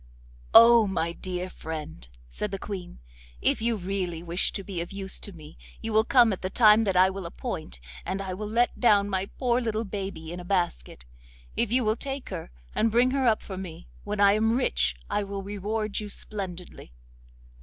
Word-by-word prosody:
'Oh! 230 -1 +9
my 170 -3 -1
dear 180 +1 -3
friend,' 160 - -6 0.2
said 210 - -3
the 195 - -4
Queen. 190 -3 -7 0.4
'If - - +2
you 230 0 +1
really 180 -3 -3
wish 175 +2 0
to 195 - -4
be 185 -3 -4
of 170 - -6
use 195 -1 -2
to 205 - -7
me 155 - -13 0.2
you 225 - -4
will 220 +1 +5
come 240 -4 +5
at 185 - -6
the 185 - -2
time 220 +1 +6
that 195 -2 0
I 185 +1 +5
will 190 -2 -5
appoint, - - -6 0.2
and 195 - -3
I 190 -1 -4
will 210 +3 -5
let 240 +3 +1
down 205 -4 +4
my 190 0 0
poor 245 +1 0
little 225 -2 -1
baby 190 -5 -5
in 180 - -6
a - - -7
basket. 175 - -2 0.5
If 235 -2 0
you 250 +1 +3
will 215 0 +2
take 275 0 -4
her, 180 -4 -6 0.2
and 225 - +2
bring 240 +3 +3
her 265 -2 +1
up 220 -2 +2
for 190 - -7
me, 175 -2 -9
when 205 0 -4
I 200 -1 +7
am 225 +2 +2
rich - - +1
I 210 - 0
will 200 0 -5
reward 205 +1 -2
you 210 -1 -6
splendidly. 185 - -6
200 Hz, 200 wpm, -27 LUFS, 180-220 Hz, 0.5 s, Oh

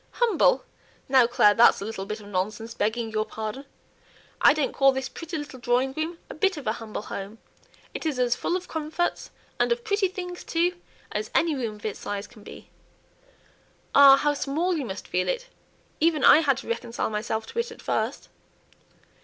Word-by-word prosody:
"Humble! 480 +1 +3 0.4
now, 260 -3 +5
Clare, 210 -4 +5
that's 230 +3 +6
a 200 - -5
little 205 -3 -5
bit 215 +1 -4
of 210 - -13
nonsense, 210 +4 -3
begging 220 +1 -1
your 215 0 0
pardon. 220 +5 -6 0.8
I - - +8
don't 295 -2 0
call 275 0 +5
this 265 0 -3
pretty 330 +4 -6
little 290 -3 -7
drawing 245 +2 +1
room 320 +3 -3
a - - -8
bit 380 +2 +1
of 290 - -7
a 215 - +1
'humble 220 -2 -6
home.' 200 +2 -7 0.6
It's 310 -5 -3
as 245 -1 +2
full 350 - -1
of 365 - -9
comforts, 320 +2 -2 0.3
and - - +2
of 475 0 0
pretty 405 -3 +1
things 360 -2 -7
too, 350 +2 0 0.3
as 210 +1 -3
any 330 -1 +3
room 230 -5 -3
of 210 - -13
its 215 - -3
size 205 0 -4
can 215 0 -16
be." - - -12 1.2
"Ah! 275 -1 +9
how 295 +1 +1
small 315 +6 -1
you 295 -5 -2
must 195 -3 -7
feel 180 +1 0
it! - - -3 0.5
even 315 -3 +2
I - - +8
had 280 -5 +2
to 270 - -8
reconcile 230 -1 -3
myself 220 +1 -2
to 465 - -5
it 470 - -1
at - - -12
first." - - -2
265 Hz, 190 wpm, -26 LUFS, 220-330 Hz, 1.2 s, Ah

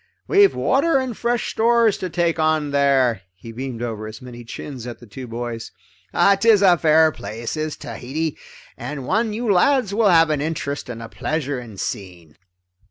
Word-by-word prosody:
We've 400 0 +5
water 280 +3 +2
and 260 -3 -2
fresh 235 +1 -1
stores 230 -1 +3
to 185 - -3
take 170 -1 0
on 155 -2 +1
there." 135 -6 +2
He 115 +5 -11
beamed 120 0 -5
over 110 -2 -4
his 110 0 -9
many 120 -1 -10
chins 125 +1 -8
at 120 - -7
the 120 - -15
two 125 +4 -9
boys. 115 0 -5 0.7
"'Tis 215 -2 +5
a 180 -2 +7
fair 160 0 +5
place, 115 -2 -6
is 155 -1 -3
Tahiti, 150 +5 -4 0.4
and 145 -3 -6
one 220 - +1
you 220 0 0
lads 220 +2 +3
will 215 -1 +3
have 165 -3 +5
an 150 -2 0
interest 145 -3 -3
and 115 -1 -6
a - - -7
pleasure 145 0 -3
in 115 -5 -11
seeing." 90 -6 -6
150 Hz, 175 wpm, -21 LUFS, 120-195 Hz, 0.7 s, a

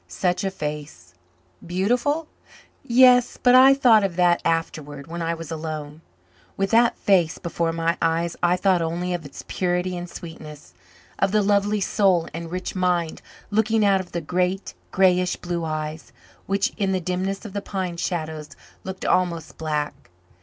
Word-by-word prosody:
Such 180 - -1
a 195 - 0
face! 150 - -7 0.5
Beautiful? 245 - 0 0.6
Yes, 250 0 +5
but 250 -1 +4
I 265 +2 +8
thought 235 -6 +5
of 190 -3 -1
that 175 -1 +3
afterward, 155 -4 -2
when 170 +2 -6
I 165 0 -1
was 165 -1 -8
alone. 155 -1 -6 0.6
With 195 0 -1
that 235 +1 +4
face 180 -5 +2
before 170 -1 -2
my 165 +1 -1
eyes 165 +1 0
I 175 +1 +3
thought 185 -2 +2
only 175 +2 -2
of 170 -3 -4
its - - -11
purity 180 0 -1
and 175 0 -6
sweetness, 155 -4 -10 0.5
of 195 - +2
the 210 0 +3
lovely 205 +1 +2
soul 190 -4 +2
and 165 +1 -6
rich 185 +1 -4
mind 180 -3 0 0.3
looking 220 0 +2
out 195 -1 +3
of 185 - -13
the 170 - -3
great, 180 +4 -1 0.2
greyish 180 -1 +3
blue 175 -1 -4
eyes 155 0 -4 0.4
which, 195 0 0
in 195 -2 0
the 185 - +1
dimness 185 +4 -3
of 205 - -8
the 200 - -3
pine 185 -4 -4
shadows, 160 -3 -3 0.3
looked 190 0 -6
almost 170 -4 0
black. 150 -2 -3
180 Hz, 160 wpm, -23 LUFS, 165-195 Hz, 0.6 s, I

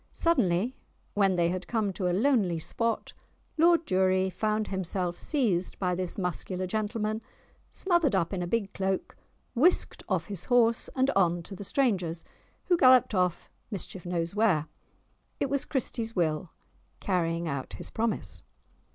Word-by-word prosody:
Suddenly, 245 - +1 0.4
when 195 -2 +3
they 170 -1 +2
had 180 0 -4
come 215 -4 0
to 180 0 -1
a - - +1
lonely 205 -4 +2
spot, 230 +8 -2 0.4
Lord 335 +1 +4
Durie 185 -1 +2
found 215 +3 -1
himself 185 -2 -2
seized 210 - 0
by 180 -2 0
this 180 0 -3
muscular 185 0 -2
gentleman, 215 +2 -2 0.5
smothered 345 - +2
up 170 0 0
in 185 - -2
a 175 - -2
big 205 0 -1
cloak, 190 0 -2 0.4
whisked 320 +9 +3
off - - 0
his 200 -5 -5
horse 235 -2 +3
and 265 +1 +2
on 175 -5 +2
to 195 - -7
the 200 - -7
stranger's, 185 -9 0 0.4
who 355 -3 +3
galloped 255 -5 +6
off, 180 -3 0 0.2
mischief 190 -3 -5
knows 170 -1 -2
where! 200 -8 +2 0.7
It 280 - -1
was 280 -1 0
Christie's 230 -4 -3
Will, 160 -1 0 0.5
carrying 170 -3 0
out 140 -4 -4
his - - -8
promise. 230 0 -2
195 Hz, 150 wpm, -28 LUFS, 180-230 Hz, 0.7 s, galloped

